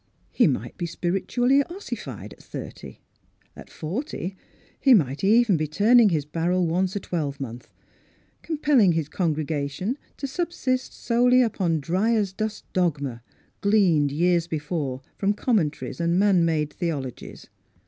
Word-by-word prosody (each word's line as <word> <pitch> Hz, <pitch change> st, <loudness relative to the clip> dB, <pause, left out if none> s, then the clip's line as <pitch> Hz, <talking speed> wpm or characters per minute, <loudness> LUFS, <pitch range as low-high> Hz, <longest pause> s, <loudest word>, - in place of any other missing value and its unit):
He -, -, +4 dB
might -, -, -3 dB
be 175 Hz, -, -2 dB
spiritually 245 Hz, -, +1 dB
ossified 380 Hz, +4 st, -7 dB
at -, -, -18 dB
thirty; -, -, -9 dB, 0.5 s
at -, -, -12 dB
forty 190 Hz, -, -5 dB, 0.4 s
he 270 Hz, -3 st, +6 dB
might 140 Hz, -, 0 dB
even 215 Hz, -1 st, +4 dB
be 155 Hz, 0 st, -1 dB
turning 215 Hz, +8 st, +5 dB
his 155 Hz, -5 st, 0 dB
barrel 170 Hz, +4 st, 0 dB
once 180 Hz, +3 st, 0 dB
a -, -, 0 dB
twelve 150 Hz, -7 st, -3 dB
month, 125 Hz, -3 st, -7 dB, 0.7 s
compelling 290 Hz, -, +3 dB
his 160 Hz, -3 st, -1 dB
congregation 155 Hz, -, -2 dB, 0.2 s
to 280 Hz, -, -4 dB
subsist 270 Hz, -4 st, -2 dB
solely 250 Hz, +2 st, +3 dB
upon 180 Hz, -8 st, 0 dB
dry 190 Hz, +10 st, +1 dB
as 200 Hz, -4 st, 0 dB
dust 215 Hz, +1 st, -4 dB
dogma, 145 Hz, -9 st, -1 dB, 0.4 s
gleaned 180 Hz, -9 st, +3 dB
years 170 Hz, +2 st, +2 dB
before 150 Hz, -4 st, -3 dB, 0.2 s
from 200 Hz, +1 st, +2 dB
commentaries 180 Hz, -, -1 dB
and 170 Hz, +1 st, +1 dB
man 195 Hz, -3 st, +4 dB
made 155 Hz, -3 st, 0 dB
theolo 145 Hz, -8 st, -3 dB
gies. -, -, -12 dB
180 Hz, 140 wpm, -24 LUFS, 155-220 Hz, 0.7 s, he